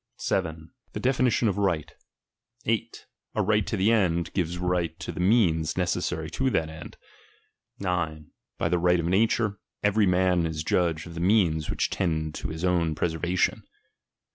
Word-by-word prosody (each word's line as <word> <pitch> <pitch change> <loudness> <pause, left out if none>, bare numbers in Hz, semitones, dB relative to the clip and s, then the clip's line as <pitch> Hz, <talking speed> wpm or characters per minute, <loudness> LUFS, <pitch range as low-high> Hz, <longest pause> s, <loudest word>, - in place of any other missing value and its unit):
7. 80 -3 -2 0.2
The - - -4
definition 125 -2 +2
of 100 - 0
righl. 90 -7 0 0.8
8. 115 +1 -2 0.3
A - - +2
^ight 105 +1 +2
to 110 - -1
the 100 +4 +3
end, 85 -7 +1
givea 90 -2 -1
a - - -7
right 90 -2 -1
to - - -5
the - - -8
means 90 -6 +3
neceKsary 90 -3 -1
to 130 +10 0
that 80 -9 0
^tid, 80 0 -10 0.8
9. 85 -5 -3 0.3
By - - 0
the 90 - +1
right 90 0 +3
of 85 - -1
nature, 105 +3 +1 0.2
every 105 0 +3
man 90 -2 +2
is 80 0 -4
judge 85 -2 0
of 85 - -9
the 85 - -6
ttieans 85 -5 +2
which - - -1
tend 80 -4 -1
to - - -5
his 80 +3 -4
own 85 -3 +1
preservation. 85 +3 0
90 Hz, 165 wpm, -26 LUFS, 80-100 Hz, 0.8 s, the